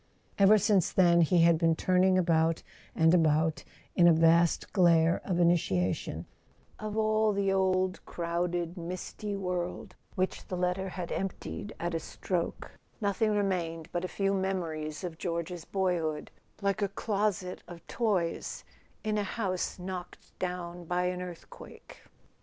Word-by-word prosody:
Ever 200 +2 +7
since 200 -3 +2
then 170 -2 +5
he 170 +1 +4
had 170 -1 +5
been 165 -1 +3
turn¬ 185 +2 +2
ing 190 0 +4
about 165 -2 +2 0.3
and 160 0 +4
about 160 -2 +2 0.3
in 175 -2 +6
a - - +8
vast 165 +1 +3
glare 170 -3 +4
of 180 -3 -1
initiation: 155 - +1 0.5
of 215 0 -4
all 215 0 +2
the 195 -1 +1
old 185 -1 +1
crowded 170 +1 -2
misty 185 +4 -5
world 180 0 -3 0.2
which 185 0 -2
the 185 - -4
letter 180 +2 -1
had 180 -1 -6
emptied 195 +2 -4
at 175 0 -2
a 165 - 0
stroke, 170 +2 -4 0.3
nothing 205 0 +1
remained 175 -5 -1
but 175 - -2
a - - -1
few 195 +1 0
mem¬ 190 -1 0
ories 155 0 -5
of 170 -2 -6
George's 170 -1 -3
boyhood, 175 -6 -1 0.3
like 200 +1 0
a 200 - +2
closet 200 -3 -2
of 170 -1 -11
toys 195 -8 -1 0.4
in 215 -1 0
a - - 0
house 190 -3 -2
knocked 180 -1 -8
down 175 -1 -4
by 175 +2 -1
an 180 0 -2
earthquake. 180 -2 -11
180 Hz, 145 wpm, -30 LUFS, 170-195 Hz, 0.5 s, a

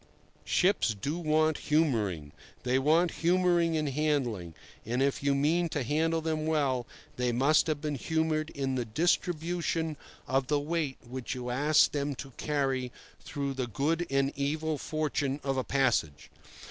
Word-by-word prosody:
Ships 180 - +2
do 150 - -2
want 155 -1 +2
humouring. 110 - +1 0.3
They 130 +1 +2
want 160 +5 +3
humouring 175 -1 +3
in 155 -1 0
handling; 130 - -1 0.3
and 120 +3 -2
if 135 0 +1
you 140 0 +2
mean 165 +5 +2
to 145 -4 -2
handle 160 +5 +1
them 155 -1 -2
well, 140 -6 +1 0.3
they 125 -1 +1
must 135 +8 +3
have 155 -2 -1
been 150 -1 -2
humoured 160 +2 0
in 135 -1 -2
the 125 -2 0
distribution 165 +4 0 0.3
of 135 0 +1
the 145 0 +2
weight 150 -2 -2
which 130 +1 -5
you 125 -1 -4
ask 150 +4 +4
them 145 -1 -2
to 135 +1 -8
carry 135 -3 -1 0.3
through 140 -1 -4
the 130 -2 -3
good 155 - -1
and 135 0 +1
evil 150 +2 -1
fortune 145 -3 -1
of 135 -1 -1
a 130 - 0
passage. 125 - 0
145 Hz, 155 wpm, -29 LUFS, 130-160 Hz, 0.3 s, ask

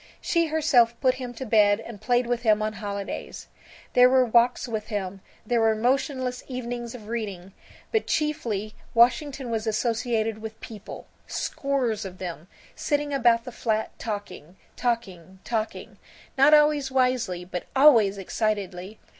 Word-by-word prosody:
She 335 -1 +1
herself 260 -7 +3
put 260 -2 +3
him 250 -1 -5
to 260 - -6
bed 210 -2 +4
and 230 -3 -10
played 245 0 +2
with 240 0 -1
him 215 -2 +3
on 215 0 -2
holidays. 200 -1 -6 0.5
There 250 0 +7
were 260 0 +4
walks 240 +2 +3
with 215 -2 -4
him, 195 -3 -4 0.2
there 235 +1 +1
were 220 -1 +3
motionless 255 +2 -1
evenings 240 -2 -5
of 215 -4 -11
reading, 200 -5 -5 0.4
but 445 -2 0
chiefly 235 -10 -1 0.2
Washington 255 +2 +3
was 225 0 -2
associated 225 0 0
with 220 0 -8
people, 215 -3 -9 0.2
scores 265 -6 -2
of 185 -1 -8
them, 170 -3 -7 0.3
sitting 290 -1 -1
about 240 -3 +3
the 250 - -8
flat, 220 -2 -1
talking, 200 -6 -6 0.2
talking, 190 -7 -3
talking, 220 -2 -4 0.4
not 275 +2 +5
always 300 -2 +4
wisely 250 -9 0
but 180 -1 -6
always 235 -8 +6
excitedly. 195 -1 -3
230 Hz, 145 wpm, -25 LUFS, 210-255 Hz, 0.5 s, There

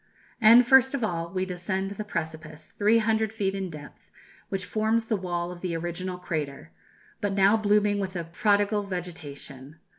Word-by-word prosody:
And, 230 +3 +8
first 265 +2 +5
of 260 - -3
all, 170 -5 -2
we 185 0 -1
descend 190 +2 -3
the 200 +1 -5
precipice, 160 -4 -6
300 220 0 +2
feet 200 -3 -1
in 195 -2 -3
depth, 150 -2 -12 0.4
which 195 -1 -3
forms 220 +2 0
the 220 - 0
wall 175 -2 -3
of 175 -1 -10
the 175 -3 -2
original 175 +2 -4
crater, 145 - -5 0.5
but 205 -1 -1
now 195 +2 +5
blooming 210 -1 +2
with 190 -1 -4
a 170 - -2
prodigal 205 +4 +1
vegetation. 155 -7 -7
190 Hz, 160 wpm, -26 LUFS, 170-210 Hz, 0.5 s, And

